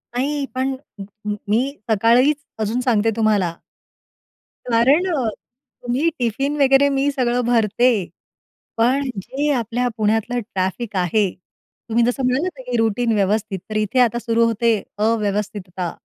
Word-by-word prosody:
नाही 280 +3 -1
पण 265 +1 0 0.2
म - - -4 0.3
म 210 - -1
मी 220 +4 +3 0.3
सकाळीच 235 +7 +4 0.2
अजून 220 +3 -1
सांगते 225 -4 +2
तुम्हाला. 210 -6 +1 1.2
कारण 265 +10 +4
अ, 270 -6 0 0.6
तुम्ही 255 +7 +1
टिफिन 270 +5 -1
वगैरे 270 +1 +5
मी 275 +1 +1
सगळं 250 -3 0
भरते. 235 +1 +3 0.9
पण 260 +4 +2
जे 280 +9 -2
आपल्या 245 -1 -1
पुण्यातलं 225 +2 0
ट्रॅफिक 205 +1 -3
आहे, 190 +3 +2 0.6
तुम्ही 230 +1 +2
जसं 245 +2 0
म्हणालात, 275 +4 -1
की 250 -1 -1
रुटीन 225 +1 +1
व्यवस्थित 205 0 0
तर 215 - -3
इथे 215 +4 0
आता 240 -1 +3
सुरु 230 -1 +1
होते 230 +1 +2 0.3
अव्यवस्थितता 205 -4 -1
235 Hz, 130 wpm, -20 LUFS, 215-255 Hz, 1.2 s, वगैरे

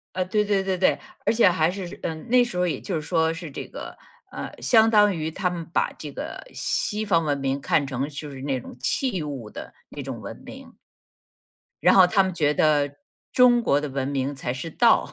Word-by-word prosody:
呃， 185 - +1
对 210 +3 0
对 200 -2 +1
对 190 -1 -1
对， 185 - +3 0.3
而 215 - +3
且 230 -2 +5
还 160 -2 +2
是， 180 -1 -6
嗯， 160 +6 -5
那 250 +1 +6
时 240 -5 -1
候 180 - +2
也 170 - -1
就 185 - -4
是 155 - -1
说 160 +1 +1
是 165 -2 -8
这 - - -6
个， - - -9 0.3
呃 - - -5
相 225 -2 +5
当 210 -2 +5
于 160 -1 -3
他 180 +3 -1
们 170 -2 -5
把 - - +1
这 - - -6
个 - - -6
西 215 0 -1
方 170 -6 +2
文 145 -1 0
明 135 0 -1
看 145 +1 +1
成 135 0 -3
就 145 0 -7
是 130 -1 -9
那 135 -1 -1
种 120 - -11
器 190 - -1
物 135 -7 -6
的 - - -9 0.2
那 - - -7
种 - - -6
文 - - -9
明。 - - -11 1.1
然 - - +6
后 190 - +9
他 195 +2 +3
们 190 - -2
觉 150 -3 +1
得， 145 -2 +2 0.3
中 245 -1 +5
国 145 -11 +2
的 150 - -4
文 135 0 -2
明 140 0 -1
才 125 -2 -3
是 135 +6 -5
道。 230 +8 +3
165 Hz, 240 characters per minute, -24 LUFS, 145-195 Hz, 1.1 s, 后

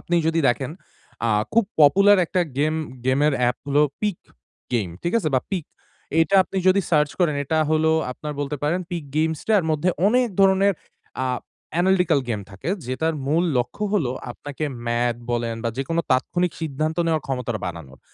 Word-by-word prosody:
আপনি 175 - -1
যদি 165 0 +2
দেখেন, 130 +3 0 0.6
আ - - +2 0.2
খুব 230 0 +4 0.2
পপুলার 195 +7 +6
একটা 185 +2 0 0.2
গেম 155 +2 +2 0.3
গেমের 145 +3 +3
অ্যাপ 125 0 +2
হলো 145 +1 +3 0.2
'Peak 210 -4 0 0.6
Game' 100 -8 0
ঠিকাছে 170 -1 +1
বা 130 - +3
পিক। 185 -6 -2 0.6
এটা 165 +5 +2
আপনি 195 - -9
যদি 195 +2 +5
সার্চ 150 -2 +3
করেন 160 -4 +3
এটা 160 +3 0
হলো 160 0 +3 0.2
আপনার 150 +3 -6
বলতে 145 +1 -2
পারেন 170 +5 +1
Peak 170 -4 -4
Games 160 0 +1
টার 210 -5 +4
মধ্যে 155 +4 +1 0.2
অনেক 245 +2 +3
ধরণের 195 +1 +5 0.5
আ - - 0 0.5
অ্যানালিটিকাল 180 -4 +3
গেম 105 -3 -1
থাকে। 95 - -7 0.2
যেটার 160 +6 -1
মূল 160 +5 +2
লক্ষ্য 125 - -1
হলো 140 -11 +1 0.2
আপনাকে 145 +4 -6 0.2
ম্যাথ 120 0 +1
বলেন 115 -1 -1
বা 115 - +2
যেকোনো 165 +5 0
তাৎক্ষণিক 175 +7 +1
সিদ্ধান্ত 155 +1 -2
নেওয়ার 160 -2 0
ক্ষমতাটা 125 -5 -3
বানানোর। 80 -6 -8
155 Hz, 165 wpm, -23 LUFS, 130-180 Hz, 0.6 s, পপুলার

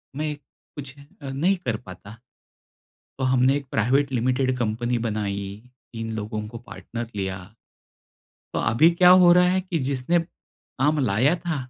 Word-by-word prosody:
मैं 150 0 -2
कुछ 140 -1 -13 0.3
अ, 140 - -6
नहीं 165 +9 +1
कर 115 -3 -1
पाता। 100 +2 -12 1.0
तो 130 - -2
हमने 130 +1 +3
एक 145 - -7
प्राइवेट 135 +5 +1
लिमिटेड 130 +1 0
कंपनी 120 +1 -1
बनाई, 100 -2 -2 0.5
3 115 0 -5
लोगों 105 0 -4
को 115 - -9
पार्टनर 120 0 -7
लिया। 95 -2 -3 1.2
तो - - 0
अभी 150 +10 +4
क्या 180 +1 +5
हो 175 - +7
रहा 180 +1 +5
है 190 - +2
कि 180 -3 -3
जिसने 140 +6 +1
काम 150 -3 -4
लाया 125 - +2
था, 170 -2 -3
130 Hz, 150 wpm, -24 LUFS, 110-150 Hz, 1.2 s, हो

